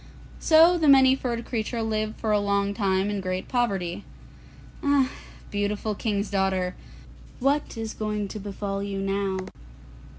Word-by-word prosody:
So 335 +2 +6
the 315 - +2
Many 265 -2 +7
furred 240 -3 -3
Creature 230 0 -2
lived 215 0 -1
for 220 - -1
a 210 - +4
long 200 0 0
time 195 -1 +1
in 205 -1 -2
great 185 0 -3
poverty. 200 -6 -1 0.8
Ah, 285 -4 +2 0.4
beautiful 205 +1 -1
King's 205 -1 -2
daughter, 190 -2 0 0.7
what 275 0 0
is 225 -1 -4
going 210 -1 -2
to 215 - -6
befall 200 0 -4
you 200 -1 -3
now? 195 -1 -1
205 Hz, 140 wpm, -26 LUFS, 195-235 Hz, 0.8 s, Many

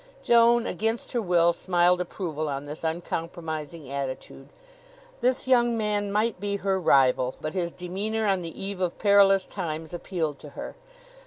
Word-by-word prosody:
Joan, 235 0 +5
against 225 +5 -2
her 240 - 0
will, 170 -3 +3
smiled 180 0 +2
approval 160 -4 -4
on 140 0 -4
this 150 +3 -8
uncompromising 160 -2 -4
attitude. 135 -2 -6 0.7
This 255 +1 +1
young 240 -2 +3
man 205 -2 -1
might 215 0 0
be 200 +1 -2
her 195 -1 0
rival, 130 -5 +3
but 155 +1 -4
his 175 -2 -2
demeanor 200 +6 -3
on 195 -3 +1
the 165 -1 -8
eve 195 -1 -5
of 180 -2 -1
perilous 200 -2 +5
times 160 -3 -5
appealed 165 -4 -3
to 150 - -11
her. - - -6
180 Hz, 155 wpm, -26 LUFS, 160-205 Hz, 0.7 s, Joan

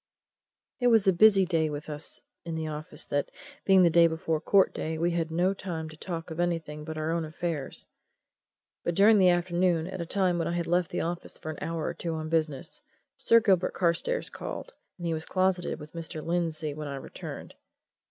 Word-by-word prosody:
It 245 - +3
was 225 -4 +5
a 190 - +6
busy 195 +1 +6
day 165 -3 +1
with 150 0 -6
us 150 0 -4 0.2
in 165 -1 -4
the 160 0 -2
office 155 0 -5
that, 145 0 -1 0.4
being 190 -1 +6
the 170 - +6
day 170 +1 +6
before 160 -1 -2
court 195 -2 +4
day, 160 - -3
and 160 - -4
we 175 - +3
had 165 -1 -1
no 175 +4 +2
time 165 -5 -5
to 155 - -11
talk 165 0 -6
of 160 - -6
anything 165 -4 -2
but 160 0 -6
our 155 +1 -1
own 165 0 0
affairs. 160 -2 -4 1.0
But 175 - -1
during 210 +3 +6
the 185 -1 +6
afternoon, 175 -1 +2
at 185 0 -5
a 170 - -5
time 185 -2 +1
when 165 - 0
I - - -1
had 170 -1 -1
left 175 0 +1
the - - -2
office 175 +1 -4
for 155 - -5
an 155 - -8
hour 165 -1 -2
or - - -2
two 165 -2 -4
on 155 0 -4
business, 155 -4 -1 0.3
Sir 230 - +5
Gilbert 190 -5 +2
Carstairs 180 - +1
called, - - -6 0.2
and 175 - -7
he 165 - 0
was 160 0 -3
closeted 185 -1 0
with 150 0 -11
Mr. 160 -2 -6
Lindsey 165 -3 0
when 150 0 -6
I 140 - -4
returned. 135 - -8
170 Hz, 210 wpm, -28 LUFS, 160-180 Hz, 1.0 s, a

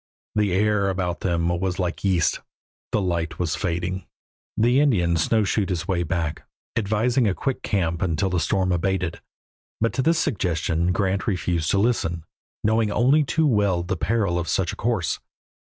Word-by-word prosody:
The 105 -2 +1
air 100 +1 +2
about 90 -2 -2
them 85 -2 0
was 90 +1 -1
like 90 -2 -2
yeast; 90 -3 +2 0.5
the - - +2
light 85 -4 -2
was 85 -3 -1
fading. 90 +2 -3 0.5
The 120 +4 +4
Indian 95 -13 +3
snowshoed 100 +3 +1
his 85 -4 -2
way 90 -3 +1
back, 80 -3 -2 0.3
advising 115 +3 +1
a 95 - +1
quick 135 -2 -2
camp 85 -5 -1
until 90 +1 0
the 90 - +1
storm 95 +4 +1
abated, 90 0 -1 0.6
but 115 +1 +1
to 135 - 0
this 165 +4 +3
suggestion 85 - 0
Grant 95 -1 0
refused 90 -4 0
to - - +2
listen, 85 -7 0 0.4
knowing 110 0 +2
only 135 +8 +4
too 160 +3 +1
well 100 - +2
the 95 +2 -2
peril 95 -1 0
of 85 - -3
such 90 -5 0
a - - -5
course. 115 -6 -1
95 Hz, 165 wpm, -24 LUFS, 85-105 Hz, 0.6 s, The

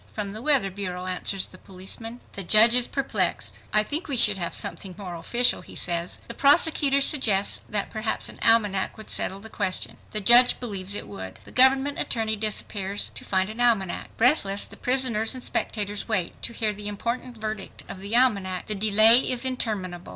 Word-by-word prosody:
"From 205 -2 -5
the 215 - -7
weather 265 -8 +1
bureau," 185 -2 -6
answers 185 +1 -1
the 185 - -13
policeman. 210 +6 -8
The 200 - -4
judge 215 +5 +7
is 245 0 +5
perplexed. 275 - -3
"I 215 0 +4
think 305 - -3
we 275 -4 -2
should 210 -4 +4
have 170 - -2
something 190 -3 -4
more 185 -4 -7
official," 240 +9 +1
he - - -13
says. 170 0 -3
The 235 - -6
prosecutor 285 0 +3
suggests 215 -9 +3
that 205 -1 -2
perhaps 220 0 -2
an - - -9
almanac 210 -4 +2
would 220 - -11
settle 190 - -2
the 220 - -11
question. 185 - -3
The 215 - 0
judge 240 +4 +6
believes 200 -5 -5
it - - -4
would. 95 -2 -8
The - - -12
government 270 +2 +3
attorney 220 -2 -1
disappears 205 -2 -2
to - - -6
find 190 -1 0
an 230 +3 -7
almanac. 215 -7 0
Breathless, 225 -6 +2
the - - -12
prisoners 250 -3 -1
and 255 - -8
spectators 205 -1 -3
wait 185 -6 -3
to - - -2
hear 220 -2 -2
the 205 0 -8
important 235 +4 -5
verdict 215 -2 -7
of 185 - -9
the 200 +4 -3
almanac. 200 -7 +1
The 215 - -1
delay 215 +3 +6
is 255 -1 -1
interminable. 205 -9 -4
215 Hz, 190 wpm, -24 LUFS, 195-245 Hz, -, judge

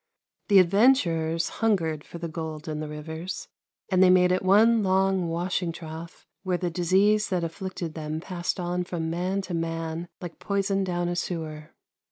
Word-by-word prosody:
The 200 - +6
adventurers 170 -5 +3
hungered 165 -9 +1
for - - -10
the 170 0 -4
gold 160 -1 -6
in 155 -1 -3
the 155 - -4
rivers, 160 +4 -6 0.4
and 185 -1 +3
they 185 - +7
made 180 0 +5
it 185 - +2
one 220 +4 +5
long 190 -2 +2
washing 175 +1 -1
trough, 165 0 -9 0.2
where 185 -2 0
the 175 -1 -2
disease 195 +5 +3
that 180 -3 0
afiflicted 170 -1 -5
them 155 0 -4
passed 175 +2 -3
on 180 0 -1
from 165 -2 -3
man 185 +3 -1
to 185 - -6
man 165 0 -3
like 175 -2 -8
poison 195 -1 0
down 175 -2 -1
a 175 - -1
sewer. 160 -3 -5
175 Hz, 170 wpm, -26 LUFS, 165-190 Hz, 0.4 s, they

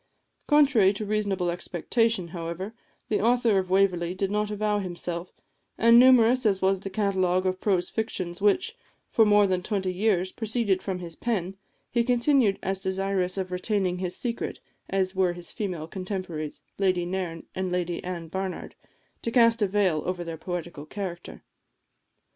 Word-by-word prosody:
Contrary 280 -10 +5
to 210 +1 -4
reasonable 200 -4 0
expectation, 185 +3 0
however, 170 +4 -5 0.4
the 210 - +1
author 235 -2 +3
of 185 -1 -4
"Waverley" 185 -2 +2
did 195 +1 -1
not 210 0 0
avow 210 0 0
himself, 175 -2 -5 0.5
and, 230 +1 +7
numerous 250 0 +6
as 200 -4 +2
was 190 0 +2
the 195 - -6
catalogue 190 -2 +1
of 185 0 -1
prose 185 -4 +1
fictions 185 -5 -3
which, 370 - +2 0.4
for 225 - +5
more 205 -1 +5
than 185 -2 0
twenty 190 -2 -2
years, 190 -2 +1
proceeded 220 -4 0
from 190 -2 -3
his 170 -2 -8
pen, 195 -6 -2 0.4
he 235 -1 +2
continued 245 -3 +3
as 190 0 -1
desirous 190 -1 -1
of 185 -1 -3
retaining 180 -1 -1
his 180 -1 -2
secret 235 -2 -3 0.3
as 190 -1 0
were 190 -2 +2
his 175 0 -10
female 185 -8 -4
contemporaries, 185 -5 -5 0.2
Lady 185 -3 +2
Nairn 175 -2 -4
and 185 -1 -2
Lady 180 -1 -2
Anne 175 -2 -5
Barnard, 190 +2 -4 0.5
to - - -2
cast 230 -1 +4
a 205 - +3
veil 185 -6 +1
over 180 -1 -2
their 165 -1 -5
poetical 170 -3 -6
character. 175 - -6
190 Hz, 160 wpm, -26 LUFS, 180-210 Hz, 0.5 s, and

